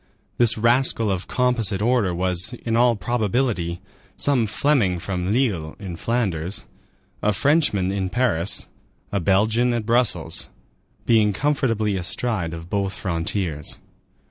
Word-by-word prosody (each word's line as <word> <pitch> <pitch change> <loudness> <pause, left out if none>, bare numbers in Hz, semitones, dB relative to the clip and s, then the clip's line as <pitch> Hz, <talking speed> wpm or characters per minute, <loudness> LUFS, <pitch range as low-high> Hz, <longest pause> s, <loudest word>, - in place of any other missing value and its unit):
This 120 -2 +4
rascal 115 -1 +2
of 95 -1 -3
composite 120 -6 +1
order 115 -3 +2
was, 90 +4 0
in 115 -1 0
all 120 0 +4
probability, 105 -4 -1 0.4
some 130 -6 +2
Fleming 110 -6 +1
from 90 +1 -3
Lille, 105 -11 0
in 95 -5 -7
Flanders, 95 -4 -1 0.6
a 105 - +2
Frenchman 105 - +2
in 95 -1 -2
Paris, 100 -6 0 0.4
a 100 - 0
Belgian 110 +6 +2
at 115 -2 -2
Brussels, 105 -9 0 0.6
being 110 -3 +3
comfortably 115 -6 0
astride 95 -1 -1
of 80 0 -8
both 100 0 -1
frontiers. 85 -3 -2
105 Hz, 120 wpm, -22 LUFS, 90-120 Hz, 0.6 s, This